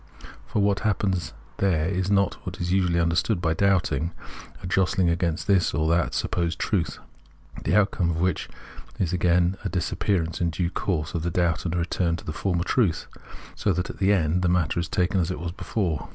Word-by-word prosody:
For 105 - 0
what 100 -1 +2
happens 95 -4 0 0.3
there 85 -5 +1
is 95 0 -1
not 100 -2 +1
what - - -6
is 90 0 -2
usually 90 -2 +2
imderstood 85 +4 +1
by 80 -2 +1
doubting, 90 -2 +1 0.5
a - - -5
jostling 90 -1 +2
against 85 -1 -1
this 95 -4 +2
or 80 0 +1
that 85 -1 +1
supposed 85 -2 -1
truth, 95 -3 -1 0.7
the 90 - +2
outcome 100 -4 +2
of 80 -1 -1
which 95 +2 0 0.5
is 90 -2 -1
again 90 +1 +2
a - - -1
disappearance 85 -1 -1
in 85 - +2
due 85 +2 -2
course 80 -5 -2
of 85 - -1
the 85 - -1
doubt 85 0 0
and 85 -1 -1
a - - 0
return 85 0 0
to 85 - -9
the 75 - -4
former 85 -1 -1
truth, 100 -4 +1 0.5
so - - +1
that 90 - -2
at - - -16
the 100 +1 +3
end 90 -2 +2
the 90 - +2
matter 85 -2 +1
is 85 - -3
taken 95 +2 +1
as 85 -1 0
it 90 - -3
was 85 0 -4
before. 90 -5 -2
90 Hz, 200 wpm, -25 LUFS, 85-95 Hz, 0.7 s, the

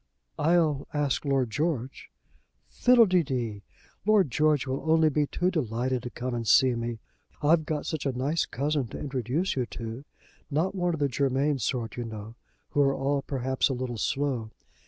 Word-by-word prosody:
"I'll 160 -4 +2
ask 145 -1 0
Lord 135 -4 +1
George." 140 -3 -2 0.6
"Fiddle 245 - +5
de 185 -3 +3
dee. 120 -8 -3 0.4
Lord 200 - +3
George 150 -1 +2
will 150 +5 +1
be 150 +1 +1
only 145 - +1
too 180 +5 0
delighted 125 - -1
to 120 - -6
come 125 +1 -4
and 115 -2 -3
see 130 0 +5
me. 115 0 -3 0.5
I've 155 +1 +3
got 150 -2 -2
such 155 -3 -2
a - - +1
nice 140 +6 -1
cousin 145 -1 -1
to - - -8
introduce 135 - -1
to 125 -3 -1
you; 115 +4 -6 0.4
not 165 +7 0
one 175 -3 0
of - - -8
the 145 - +2
Germain 140 +2 +1
sort, 120 -1 -2
you 120 - -3
know, 110 0 -7 0.4
who 145 - +2
are 135 -1 +3
all 140 +1 0
perhaps 130 -1 0
a - - 0
little 125 -2 -4
slow. 135 -5 -1
135 Hz, 175 wpm, -27 LUFS, 125-155 Hz, 0.6 s, Fiddle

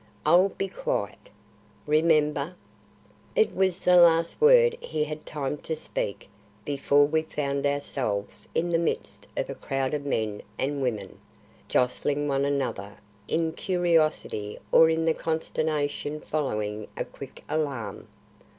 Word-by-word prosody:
"I'll 185 +3 +5
be 195 - -3
quiet." - - -3 0.6
"Remember." 150 0 +2 0.8
It 450 -3 +3
was 190 -1 +1
the 180 0 +6
last 170 - +5
word 475 0 +6
he 155 -1 -2
had 155 0 -6
time 150 -1 -3
to 160 - -3
speak 100 -9 -4 0.4
before 145 0 +3
we 155 +2 +1
found 140 -2 -2
ourselves 130 -7 -3
in 175 +1 +1
the 165 - +3
midst 170 - -3
of - - -1
a - - -4
crowd 135 0 -2
of 150 -1 -2
men 110 -7 -2 0.2
and 140 +1 -1
women, 110 -7 -3 0.5
jostling 145 +4 +1
one 140 0 +1
another 130 -8 -2 0.3
in 165 0 0
curiosity 165 - 0
or 160 - +7
in 160 0 +1
the 165 - +3
consternation 155 -2 -2
following 105 -9 -2
a - - -2
quick - - -11
alarm. 145 -7 -3
150 Hz, 130 wpm, -27 LUFS, 135-165 Hz, 0.8 s, or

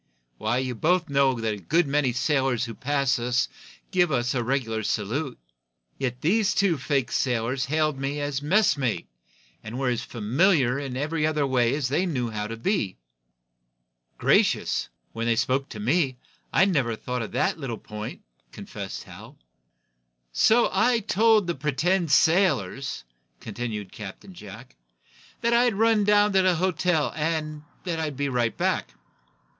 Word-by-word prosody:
Why, 110 +3 0
you 130 -1 -1
both 170 +7 +1
know 135 -3 +3
that 110 -1 -1
a - - -6
good 160 - +1
many 140 -2 +1
sailors 130 -2 +1
who 115 - -7
pass 140 +1 0
us 125 +1 +1 0.4
give 180 -4 +2
us 120 -2 0
the 125 -2 -1
regular 115 -3 -1
salute. 120 +7 -2 0.6
Yet 125 -1 -3
these 205 +5 +2
two 195 -7 +2
fake 135 -2 -1
sailors 125 +1 0
hailed 155 -1 0
me 140 +2 -2
as 145 -1 -2
'messmate' 145 - +1 0.6
and 110 +3 -6
were 135 -1 0
as 120 -2 -1
familiar 130 - +1
in 135 -3 -5
every 155 +2 0
other 150 -2 0
way 125 -1 +2
as 145 -3 -1
they 175 +8 0
knew 125 -8 -2
how 105 -1 -3
to 115 +1 -6
be." 115 - -1 1.2
"Gracious! - - +2 0.2
When 115 +1 -3
they 115 - +3
spoke 130 +4 0
to 105 - -8
me, 130 +3 +1 0.3
I - - +4
never 140 - +1
thought 125 +2 -4
of 115 - -6
that - - 0
little 125 -6 -4
point," 105 0 -8 0.3
confessed - - -7
Hal. - - -13 1.0
"So 230 - +4
I 235 +5 +3
told 220 0 +3
the 170 - -1
pretended 160 +5 0
sailors," 140 - +2 0.4
continued 110 -5 -5
Captain 110 - -9
Jack, 100 - -12 0.7
"that 235 0 +2
I'd 240 -2 +3
run 220 0 +3
down 205 0 +4
to 190 - +5
the 185 -1 +3
hotel, 180 -3 0
and 155 -1 -2 0.2
that 170 -3 -3
I'd 150 -4 -3
be 140 0 -1
right 120 -3 0
back." - - -1
140 Hz, 155 wpm, -25 LUFS, 120-170 Hz, 1.2 s, to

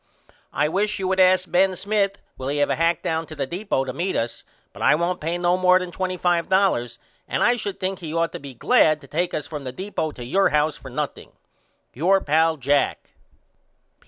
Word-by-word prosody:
I 150 - +1
wish 205 +6 0
you 190 - -2
would 190 0 0
ask 185 0 +4
Ben 185 +1 +3
Smith 200 +1 0 0.2
will 130 - -6
he 145 +1 -1
have 145 - +2
a - - +2
hack 165 +1 +1
down 160 0 -2
to 155 - -9
the 140 - -2
deepo 175 -3 -2
to 130 - -5
meet 180 +7 -2
us 115 +1 -3 0.3
but - - -11
I - - +5
won't 175 +3 -1
pay 165 +3 -1
no 175 +1 +2
more 185 0 +5
than 180 -1 -4
$25 180 - 0 0.3
and - - 0
I 240 - +4
should 205 -4 -5
think 190 -1 -2
he 165 - -7
should 160 - -3
ought 165 0 +1
to - - -7
be 140 -2 -10
glad 155 +5 +3
to 140 - -14
take 175 +6 -1
us 150 - -3
from 150 -3 -7
the 130 - -5
deepo 185 0 -3
to 120 - -8
your 195 +10 +2
house 150 0 +1
for 135 - -11
nothing. 145 +3 -5 0.6
Your 185 +8 +3
pal, 160 0 +2
JACK. 140 +1 0
170 Hz, 215 wpm, -23 LUFS, 150-185 Hz, 0.6 s, I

